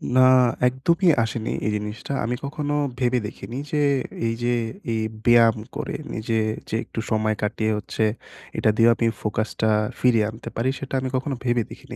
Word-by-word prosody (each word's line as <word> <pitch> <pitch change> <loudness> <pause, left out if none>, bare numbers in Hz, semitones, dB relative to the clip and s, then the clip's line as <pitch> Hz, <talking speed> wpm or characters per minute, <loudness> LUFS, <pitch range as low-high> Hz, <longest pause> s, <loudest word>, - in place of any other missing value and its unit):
না 130 - +7 0.5
একদমই 165 +9 +1 0.2
আসেনি 110 0 -3 0.2
এই - - +1
জিনিসটা। 105 +5 -4
আমি 120 +2 -1
কখনো 145 +1 -2 0.2
ভেবে 125 -1 +2
দেখিনি 115 +3 -8
যে 150 - +1 0.5
এই 115 - 0
যে, 120 0 +2 0.4
এই 110 - 0 0.2
ব্যায়াম 120 -1 +6 0.2
করে - - -3 0.2
নিজে 110 0 -1 0.3
যে - - -2
একটু - - -6
সময় 110 0 +1
কাটিয়ে 110 +1 0
হচ্ছে, 105 +2 -2 0.5
এটা - - +3
দিয়েও 115 0 +6
আপনি 115 - +1
ফোকাসটা 110 +1 -1 0.3
ফিরিয়ে 115 -4 +4
আনতে 110 0 -8
পারি, 120 +3 +1
সেটা 135 - -7
আমি 130 0 -2
কখনো 135 +2 -1
ভেবে 120 -1 +2
দেখিনি। - - -10
115 Hz, 165 wpm, -23 LUFS, 110-130 Hz, 0.5 s, না